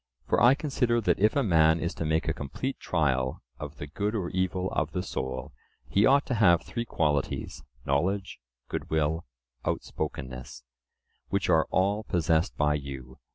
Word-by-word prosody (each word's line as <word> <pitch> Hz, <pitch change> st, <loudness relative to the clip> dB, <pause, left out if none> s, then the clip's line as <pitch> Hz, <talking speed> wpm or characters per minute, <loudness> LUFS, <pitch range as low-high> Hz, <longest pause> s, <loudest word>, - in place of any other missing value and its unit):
For -, -, +2 dB
I 125 Hz, +3 st, +7 dB
consider 130 Hz, -5 st, +1 dB
that 110 Hz, -, +1 dB
if 105 Hz, +2 st, +3 dB
a 140 Hz, -, +3 dB
man 80 Hz, -5 st, +4 dB
is 85 Hz, -, -2 dB
to 80 Hz, -, -4 dB
make 80 Hz, +1 st, +1 dB
a -, -, +1 dB
complete 75 Hz, -, -4 dB
trial 65 Hz, -6 st, 0 dB, 0.2 s
of 75 Hz, -1 st, -7 dB
the -, -, -5 dB
good 100 Hz, +9 st, -2 dB
or 90 Hz, -5 st, -2 dB
evil 95 Hz, 0 st, -1 dB
of -, -, -1 dB
the -, -, -1 dB
soul, 65 Hz, +1 st, -4 dB, 0.3 s
he 100 Hz, +2 st, +4 dB
ought 140 Hz, +2 st, +4 dB
to 130 Hz, -, -2 dB
have 90 Hz, -7 st, +4 dB
three 120 Hz, -1 st, -4 dB
qualities—knowledge, 80 Hz, -, -1 dB, 0.3 s
good -, -, -4 dB
will, 80 Hz, 0 st, 0 dB, 0.4 s
outspokenness, 65 Hz, -1 st, -4 dB, 0.7 s
which 100 Hz, -2 st, 0 dB
are 80 Hz, -1 st, +4 dB
all 100 Hz, +3 st, +1 dB
possessed 85 Hz, -4 st, +1 dB
by 75 Hz, 0 st, +3 dB
you. 70 Hz, -3 st, -6 dB
85 Hz, 160 wpm, -28 LUFS, 75-100 Hz, 0.7 s, I